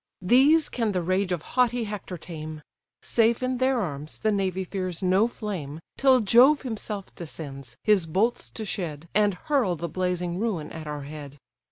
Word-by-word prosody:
These 275 Hz, -, +5 dB
can 225 Hz, -4 st, -1 dB
the 180 Hz, -, 0 dB
rage 185 Hz, +2 st, 0 dB
of 175 Hz, -3 st, -1 dB
haughty 245 Hz, -1 st, +2 dB
Hector 205 Hz, -4 st, -5 dB
tame: 155 Hz, -2 st, -7 dB, 0.4 s
Safe 230 Hz, +1 st, +2 dB
in 255 Hz, -1 st, -1 dB
their 260 Hz, -1 st, +2 dB
arms, 150 Hz, -6 st, -4 dB
the 220 Hz, -, +1 dB
navy 190 Hz, -2 st, 0 dB
fears 185 Hz, -1 st, -4 dB
no 190 Hz, +4 st, +4 dB
flame, 180 Hz, -11 st, -5 dB, 0.2 s
Till 260 Hz, -2 st, +5 dB
Jove 250 Hz, +8 st, +6 dB
himself 215 Hz, -5 st, -5 dB
descends, 140 Hz, -7 st, -8 dB
his 200 Hz, -6 st, +3 dB
bolts 205 Hz, +9 st, 0 dB
to 220 Hz, -, -4 dB
shed, 170 Hz, -6 st, -4 dB
And 205 Hz, -1 st, +3 dB
hurl 245 Hz, -, +1 dB
the 170 Hz, +1 st, -4 dB
blazing 180 Hz, +1 st, -2 dB
ruin 195 Hz, -9 st, -2 dB
at 160 Hz, -1 st, -7 dB
our 150 Hz, -1 st, -4 dB
head. 145 Hz, -1 st, -9 dB
190 Hz, 170 wpm, -26 LUFS, 165-230 Hz, 0.4 s, Jove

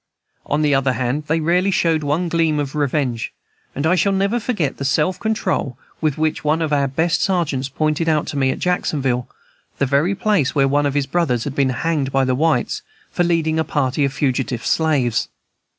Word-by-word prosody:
On 150 Hz, +2 st, +1 dB
the 145 Hz, -1 st, +3 dB
other 135 Hz, -1 st, +2 dB
hand, 130 Hz, +4 st, -2 dB
they 160 Hz, +2 st, +1 dB
rarely 175 Hz, +4 st, +2 dB
showed 165 Hz, -4 st, +2 dB
one 150 Hz, +5 st, 0 dB
gleam 165 Hz, -2 st, +1 dB
of 145 Hz, -2 st, -2 dB
revenge, 140 Hz, -5 st, -1 dB, 0.4 s
and 140 Hz, -, -2 dB
I 160 Hz, -, +4 dB
shall 190 Hz, +2 st, +2 dB
never 195 Hz, +4 st, +1 dB
forget 210 Hz, -, -2 dB
the -, -, -4 dB
self 150 Hz, +6 st, +1 dB
control 215 Hz, -, -1 dB, 0.2 s
with 155 Hz, -2 st, 0 dB
which 155 Hz, 0 st, -1 dB
one 155 Hz, +2 st, +1 dB
of 155 Hz, -2 st, -1 dB
our 140 Hz, -1 st, +2 dB
best 160 Hz, +6 st, 0 dB
sergeants 155 Hz, -8 st, 0 dB
pointed 155 Hz, +3 st, 0 dB
out 155 Hz, -2 st, +1 dB
to -, -, -5 dB
me, 135 Hz, -1 st, +2 dB
at -, -, -1 dB
Jacksonville, 135 Hz, -8 st, -1 dB, 0.5 s
the 140 Hz, -, +1 dB
very 145 Hz, +9 st, +1 dB
place 195 Hz, -10 st, +1 dB
where 135 Hz, -1 st, +4 dB
one 145 Hz, +1 st, +2 dB
of 140 Hz, -, -3 dB
his 145 Hz, -1 st, +1 dB
brothers 135 Hz, -8 st, 0 dB
had 145 Hz, -, -4 dB
been 135 Hz, -1 st, +1 dB
hanged 140 Hz, +2 st, -1 dB
by 135 Hz, 0 st, +2 dB
the 130 Hz, -, +1 dB
whites 155 Hz, +4 st, +1 dB, 0.3 s
for 175 Hz, -, +1 dB
leading 160 Hz, -2 st, +1 dB
a -, -, +2 dB
party 145 Hz, -2 st, 0 dB
of 140 Hz, -, +1 dB
fugitive 130 Hz, -4 st, -1 dB
slaves. 140 Hz, -8 st, +1 dB
150 Hz, 200 wpm, -20 LUFS, 135-165 Hz, 0.5 s, I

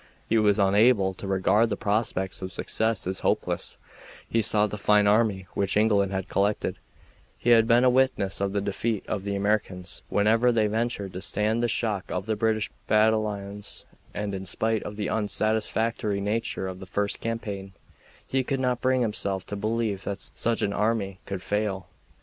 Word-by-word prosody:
He 115 Hz, -, +3 dB
was 105 Hz, -1 st, +3 dB
unable 100 Hz, 0 st, +4 dB
to 95 Hz, -, -8 dB
regard 100 Hz, +4 st, +3 dB
the 100 Hz, -, -2 dB
prospects 100 Hz, -3 st, -1 dB
of 95 Hz, 0 st, -5 dB
success 110 Hz, +4 st, -1 dB
as 95 Hz, +1 st, -2 dB
hopeless; -, -, -1 dB, 0.5 s
he 115 Hz, -, +1 dB
saw 105 Hz, 0 st, +2 dB
the 105 Hz, 0 st, -5 dB
fine 105 Hz, 0 st, +4 dB
army 105 Hz, -3 st, +2 dB
which 100 Hz, 0 st, 0 dB
England 105 Hz, -2 st, +3 dB
had 95 Hz, -1 st, -3 dB
collected; 100 Hz, +1 st, 0 dB, 0.6 s
he 120 Hz, -, +1 dB
had 115 Hz, -1 st, +6 dB
been 120 Hz, +1 st, +5 dB
a 130 Hz, -, +6 dB
witness 125 Hz, -7 st, +1 dB
of 100 Hz, -1 st, 0 dB
the 100 Hz, 0 st, -1 dB
defeat 100 Hz, +2 st, -2 dB
of 100 Hz, -3 st, -2 dB
the 100 Hz, 0 st, -2 dB
Americans 100 Hz, -3 st, -2 dB
whenever 115 Hz, +4 st, +3 dB
they 110 Hz, -2 st, +2 dB
ventured 105 Hz, -2 st, -2 dB
to 90 Hz, -, -6 dB
stand 105 Hz, +4 st, 0 dB
the 120 Hz, -, +2 dB
shock 110 Hz, -4 st, -1 dB
of 90 Hz, +1 st, -3 dB
the 110 Hz, 0 st, 0 dB
British 110 Hz, 0 st, 0 dB, 0.2 s
battalions; 105 Hz, -2 st, 0 dB, 0.3 s
and 105 Hz, -1 st, -4 dB
in 95 Hz, 0 st, -5 dB
spite 110 Hz, +3 st, 0 dB
of 105 Hz, -, -7 dB
the 105 Hz, -, -2 dB
unsatisfactory 110 Hz, 0 st, 0 dB
nature 105 Hz, -1 st, -2 dB
of 95 Hz, 0 st, -6 dB
the 95 Hz, -, -9 dB
first 100 Hz, +2 st, -1 dB
campaign, 100 Hz, -4 st, -4 dB, 0.5 s
he 130 Hz, 0 st, 0 dB
could 135 Hz, +1 st, -2 dB
not 125 Hz, -2 st, 0 dB
bring 130 Hz, 0 st, +2 dB
himself 100 Hz, -4 st, -1 dB
to 105 Hz, -, -5 dB
believe 105 Hz, -1 st, -1 dB
that 100 Hz, 0 st, -3 dB
such 115 Hz, -1 st, 0 dB
an 100 Hz, -1 st, 0 dB
army 105 Hz, -3 st, 0 dB
could 95 Hz, -2 st, -4 dB
fail. 105 Hz, -3 st, -1 dB
105 Hz, 180 wpm, -26 LUFS, 100-110 Hz, 0.6 s, had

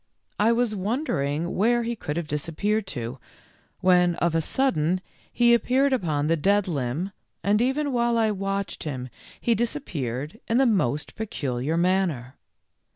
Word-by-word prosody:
I 215 Hz, +3 st, +4 dB
was 235 Hz, -2 st, +1 dB
wondering 175 Hz, -, -1 dB
where 235 Hz, +4 st, +3 dB
he 235 Hz, +1 st, -2 dB
could 150 Hz, -7 st, -4 dB
have 170 Hz, -, -2 dB
disappeared 185 Hz, +8 st, -1 dB
to, 125 Hz, -5 st, -5 dB, 0.6 s
when 180 Hz, -2 st, +4 dB
of 170 Hz, -1 st, 0 dB
a 165 Hz, -, +2 dB
sudden 180 Hz, -, +1 dB, 0.3 s
he 240 Hz, 0 st, +4 dB
appeared 265 Hz, +3 st, +3 dB
upon 155 Hz, -, 0 dB
the 165 Hz, +2 st, +3 dB
dead 200 Hz, +5 st, +2 dB
limb, 150 Hz, +4 st, -2 dB, 0.3 s
and 210 Hz, +2 st, +3 dB
even 270 Hz, +3 st, 0 dB
while 235 Hz, -1 st, +2 dB
I 220 Hz, -1 st, +3 dB
watched 195 Hz, 0 st, -3 dB
him 130 Hz, -4 st, -4 dB, 0.3 s
he 235 Hz, -, +2 dB
dis 230 Hz, +4 st, 0 dB
appeared 145 Hz, -, -4 dB
in 230 Hz, -, +2 dB
the 270 Hz, -, +5 dB
most 150 Hz, -, +1 dB
peculiar 145 Hz, -, -2 dB
manner. 170 Hz, -8 st, 0 dB
190 Hz, 155 wpm, -25 LUFS, 150-230 Hz, 0.6 s, the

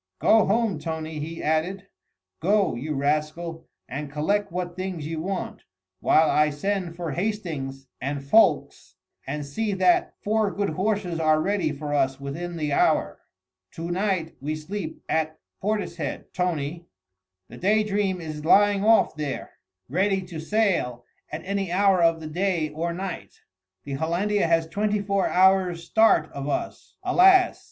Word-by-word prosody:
"Go 220 Hz, -, +4 dB
home, 210 Hz, -4 st, +1 dB
Tony!" 160 Hz, -1 st, -4 dB
he 165 Hz, +3 st, -6 dB
added, 170 Hz, +5 st, 0 dB, 0.5 s
"go, 200 Hz, +3 st, +2 dB
you 145 Hz, +6 st, -4 dB
rascal, 155 Hz, +4 st, -2 dB, 0.2 s
and 140 Hz, +2 st, -5 dB
collect 200 Hz, +7 st, 0 dB
what 175 Hz, 0 st, -4 dB
things 185 Hz, -4 st, -4 dB
you 160 Hz, 0 st, -4 dB
want, 190 Hz, +2 st, -4 dB, 0.4 s
while 160 Hz, 0 st, +4 dB
I 150 Hz, 0 st, +3 dB
send 175 Hz, +3 st, -2 dB
for 170 Hz, -3 st, -4 dB
Hastings 150 Hz, -8 st, -3 dB
and 140 Hz, +2 st, -3 dB
Ffoulkes, 215 Hz, +12 st, +2 dB, 0.3 s
and 145 Hz, +1 st, -3 dB
see 205 Hz, +9 st, -2 dB
that 185 Hz, -2 st, +2 dB
four 215 Hz, 0 st, +1 dB
good 200 Hz, -3 st, -2 dB
horses 185 Hz, -1 st, -1 dB
are 155 Hz, -1 st, +3 dB
ready 185 Hz, -2 st, 0 dB
for 145 Hz, 0 st, -5 dB
us 135 Hz, -2 st, +1 dB
within 165 Hz, +5 st, -5 dB
the 150 Hz, -2 st, -1 dB
hour. -, -, +2 dB, 0.5 s
To 165 Hz, +1 st, -5 dB
night 185 Hz, -3 st, -1 dB
we 150 Hz, +3 st, -2 dB
sleep 160 Hz, +2 st, -6 dB
at 155 Hz, 0 st, -1 dB, 0.2 s
Portishead, 210 Hz, +1 st, -3 dB
Tony. 170 Hz, -2 st, -2 dB, 0.6 s
The -, -, -12 dB
Day 210 Hz, +3 st, +2 dB
Dream 200 Hz, -3 st, 0 dB
is 155 Hz, -2 st, -6 dB
lying 205 Hz, +4 st, +4 dB
off 220 Hz, -6 st, +4 dB
there, 150 Hz, -3 st, -4 dB, 0.4 s
ready 190 Hz, +6 st, +1 dB
to 175 Hz, -3 st, -8 dB
sail 160 Hz, -, 0 dB, 0.3 s
at 155 Hz, +3 st, -6 dB
any 195 Hz, -2 st, -2 dB
hour 195 Hz, 0 st, +3 dB
of 165 Hz, -1 st, +3 dB
the 155 Hz, -, -6 dB
day 170 Hz, -1 st, 0 dB
or 165 Hz, +3 st, -3 dB
night. 180 Hz, +1 st, -6 dB, 0.4 s
The 140 Hz, -, -6 dB
Hollandia 175 Hz, +7 st, 0 dB
has 165 Hz, 0 st, +3 dB
twenty 210 Hz, +5 st, 0 dB
four 200 Hz, -1 st, 0 dB
hours' 185 Hz, -2 st, +3 dB
start 220 Hz, -6 st, +3 dB
of 140 Hz, +1 st, -5 dB
us, -, -, -4 dB
alas! 370 Hz, 0 st, +5 dB
170 Hz, 150 wpm, -25 LUFS, 155-200 Hz, 0.6 s, alas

